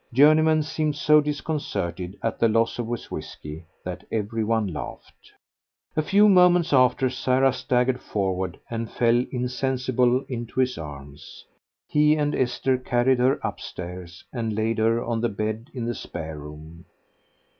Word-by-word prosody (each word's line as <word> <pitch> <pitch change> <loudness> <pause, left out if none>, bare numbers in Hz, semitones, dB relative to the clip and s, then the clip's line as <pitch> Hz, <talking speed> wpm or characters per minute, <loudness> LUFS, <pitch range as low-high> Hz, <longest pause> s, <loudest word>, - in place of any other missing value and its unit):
Journeyman 155 +4 +5
seemed 155 -1 -1
so 150 +1 +5
disconcerted 140 - -3
at 115 - -2
the 115 - +4
loss 115 +2 +1
of 115 -1 -3
his 120 -1 -5
whisky 75 +3 -7 0.2
that 90 -1 -5
every 110 +1 -1
one 110 0 +1
laughed. 80 -6 -8 0.6
A 155 - +2
few 200 +7 +4
moments 180 -4 +5
after 130 0 +4
Sarah 130 +1 +2
staggered 125 0 0
forward 95 -3 -2
and 115 -1 -4
fell 120 +1 +2
insensible 125 0 0
into 120 0 -5
his 130 -1 +2
arms. 70 -2 -10 0.4
He 150 0 +4
and 145 -1 0
Esther 130 +1 0
carried 125 0 +2
her 130 +3 +3
upstairs 90 -1 -7
and 115 -4 -2
laid 110 +1 0
her 115 +1 +2
on 115 -1 -1
the 120 - +1
bed 110 +4 -4
in 120 -3 -4
the 120 - -1
spare 80 -7 -7
room. 75 +3 -11
120 Hz, 145 wpm, -24 LUFS, 105-135 Hz, 0.6 s, Journeyman